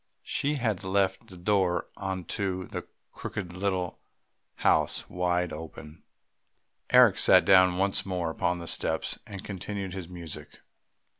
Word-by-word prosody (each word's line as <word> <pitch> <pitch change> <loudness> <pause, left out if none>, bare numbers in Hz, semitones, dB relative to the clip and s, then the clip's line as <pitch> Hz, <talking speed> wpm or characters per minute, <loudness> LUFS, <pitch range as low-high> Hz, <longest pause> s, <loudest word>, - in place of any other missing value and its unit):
She 145 +2 -1
had 110 -8 -1
left 95 0 0
the 95 - -11
door 90 -2 +1
into 95 0 -2
the - - -6 0.2
crooked 90 -4 -6
little 90 -1 -2 0.6
house - - +1
wide 90 0 0
open. 75 0 -9 0.9
Eric - - +6
sat - - +7
down 95 -2 +6
once 95 +1 +1
more 90 -4 -2
upon 90 +2 0
the 85 - -7
steps - - -2
and 100 -2 -7
continued 100 -1 -5
his 95 -3 -6
music. 80 -4 -9
90 Hz, 130 wpm, -28 LUFS, 90-95 Hz, 0.9 s, sat